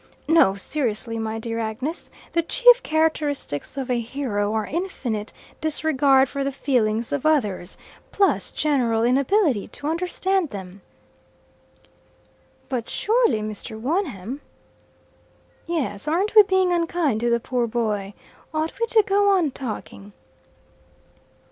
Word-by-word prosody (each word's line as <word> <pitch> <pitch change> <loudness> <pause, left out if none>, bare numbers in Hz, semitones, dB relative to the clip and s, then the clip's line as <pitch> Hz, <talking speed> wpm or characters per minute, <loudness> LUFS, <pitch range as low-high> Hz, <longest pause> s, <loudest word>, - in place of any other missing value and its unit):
No, 320 -12 +5
seriously, 225 0 -2
my 220 0 -3
dear 230 0 -4
Agnes, 230 - -4 0.2
the 335 - +3
chief - - +5
characteristics 300 - -1
of 265 -2 -3
a 245 - +1
hero 225 -4 -2
are 220 -1 -1
infinite 250 - -3 0.3
disregard 285 -3 +3
for 280 +2 -3
the 275 - -1
feelings 235 -5 0
of 285 -2 -1
others, 210 - 0 0.3
plus 395 -1 +1
general 245 -7 +1
inability 275 - +2
to - - -10
understand 360 +2 0
them." 190 -2 -9 1.9
"But 245 -4 -3
surely 450 - +2
Mr. 215 +1 -6
Wonham 270 - -2 0.6
" - - -35 0.5
"Yes; 270 -10 -2
aren't 370 +8 +1
we 435 - +10
being 375 -3 +2
unkind 335 -8 0
to 240 +1 0
the 235 0 +2
poor 245 0 -1
boy. 210 -4 -2 0.4
Ought 315 +5 -2
we 465 - +1
to 445 -2 +4
go 405 -1 +3
on 320 -6 +1
talking?" 215 -5 -7
270 Hz, 125 wpm, -23 LUFS, 220-330 Hz, 1.9 s, we